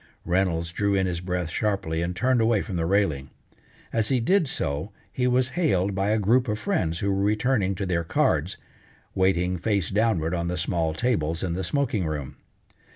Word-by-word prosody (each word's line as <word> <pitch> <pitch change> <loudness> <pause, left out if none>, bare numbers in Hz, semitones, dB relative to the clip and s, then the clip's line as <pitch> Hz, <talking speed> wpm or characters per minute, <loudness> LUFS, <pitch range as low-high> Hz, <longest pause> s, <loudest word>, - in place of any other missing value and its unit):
Reynolds 85 -2 0
drew 100 +2 0
in 95 -1 +2
his 85 -2 -2
breath 90 -2 -3
sharply 95 -7 -1
and 85 +1 -2
turned 125 +4 +2
away 110 -2 +2
from 100 - -6
the 80 -1 0
railing. 80 -9 +1 0.6
As 110 -2 +1
he 130 - +2
did 170 +7 +2
so 75 - -2 0.2
he 125 -1 0
was 125 0 +2
hailed 100 - +1
by 95 +1 0
a 110 - +2
group 120 +5 +2
of 105 -1 -1
friends 90 - -1
who 100 - +1
were 95 - 0
returning 105 -1 +1
to 100 +1 -3
their 85 -2 0
cards, - - 0 0.6
waiting 90 -1 +1
face 100 -3 0
downward 95 -6 +1
on 85 -1 -1
the 90 +1 -2
small 85 -2 -1
tables 85 -8 0
in 90 -3 -1
the 95 +2 -3
smoking 125 - 0
room. 75 -4 -5
95 Hz, 190 wpm, -25 LUFS, 85-110 Hz, 0.6 s, in